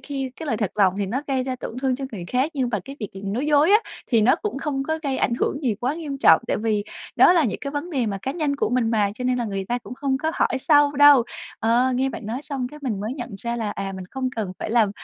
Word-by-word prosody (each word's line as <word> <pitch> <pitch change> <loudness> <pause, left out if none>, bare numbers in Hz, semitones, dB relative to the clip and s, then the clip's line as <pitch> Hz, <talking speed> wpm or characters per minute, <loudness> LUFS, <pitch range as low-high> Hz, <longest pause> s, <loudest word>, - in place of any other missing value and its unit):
khi 270 -2 -4
cái 320 - -7
lời 240 - 0
thật 210 -3 -1
lòng 190 -3 +3
thì 200 - 0
nó 255 +9 -2
gây 265 -2 0
ra 260 -1 -3
tổn 240 - -7
thương 260 -2 +1
cho 275 - -5
người 180 -5 -6
khác, 260 +5 +1
nhưng 260 -3 0
mà 210 - +1
cái 275 +1 -9
việc 210 - -3
là 195 - -9
nói 230 +9 -2
dối 300 +4 +4
á 420 - +7 0.3
thì 230 -4 +3
nó 250 +9 +4
cũng 420 -9 -4
không 275 -1 -2
có 315 0 0
gây 275 -3 -1
ảnh 235 - +1
hưởng 290 - -1
gì 235 -5 +1
quá 250 +7 -2
nghiêm 295 -4 -5
trọng. - - +6
Tại - - 0
vì 210 -2 0 0.3
đó - - +7
là 335 -4 +4
những 220 - -2
cái 280 - -4
vấn 295 +5 -4
đề 260 -7 0
mà 200 -2 -2
cá 270 - -2
nhân 300 -4 -1
của - - 0
mình 245 -2 +1
mà, 210 -3 +2
cho 250 +3 -6
nên 250 0 +1
là 240 - -1
người 195 -2 -3
ta 240 +5 -1
cũng 245 - -10
không 270 -1 -1
có 315 +3 -1
hỏi 260 - +1
sâu 290 0 +4
đâu. 290 -3 +7 0.4
Ờ, 240 +3 +3
nghe 265 +2 +1
bạn 240 - -7
nói 240 +6 -4
xong 275 -5 -3
cái 300 - -11
mình 220 -7 -2
mới 215 +4 -3
nhận 245 -4 -6
ra 235 +2 -3
là, 220 -3 -2
à, 195 -1 -4
mình 190 - -7
không 260 -1 -2
cần 205 -5 -2
phải - - -4
làm 225 -4 +3
255 Hz, 305 wpm, -23 LUFS, 220-280 Hz, 0.4 s, á